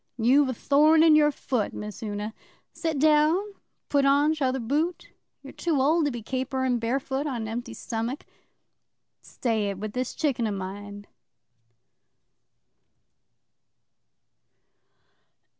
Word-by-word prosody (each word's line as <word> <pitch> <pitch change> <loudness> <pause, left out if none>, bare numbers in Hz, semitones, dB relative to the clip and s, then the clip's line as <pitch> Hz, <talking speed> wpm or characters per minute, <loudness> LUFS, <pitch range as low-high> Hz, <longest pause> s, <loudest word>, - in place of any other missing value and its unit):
'You've 260 +4 +4
a - - -1
thorn 305 +5 +4
in 320 -2 +6
your 300 -1 +5
foot, 250 -5 -2
Miss 210 0 -7
Una. 210 0 -4 0.4
Sit 320 -3 -2
down, 305 +2 +4
and 405 +2 -4 0.3
put 285 -1 +2
on 285 +2 +4
your - - -1
t'other 265 -3 0
boot. 300 +9 -2 0.3
You're - - -10
too 325 -5 -1
old 310 +4 +3
to 290 - 0
be 240 -3 -6
caperin' 260 0 -1
barefoot 265 +4 -2
on 245 -5 -3
an - - -5
empty 235 +1 -5
stomach. 230 +5 -4 1.0
Stay 220 -4 -2
it 200 - -4
with 210 +1 -6
this 250 0 -3
chicken 260 -7 0
o' - - -2
mine. 200 +1 -7
260 Hz, 130 wpm, -26 LUFS, 225-295 Hz, 1.0 s, in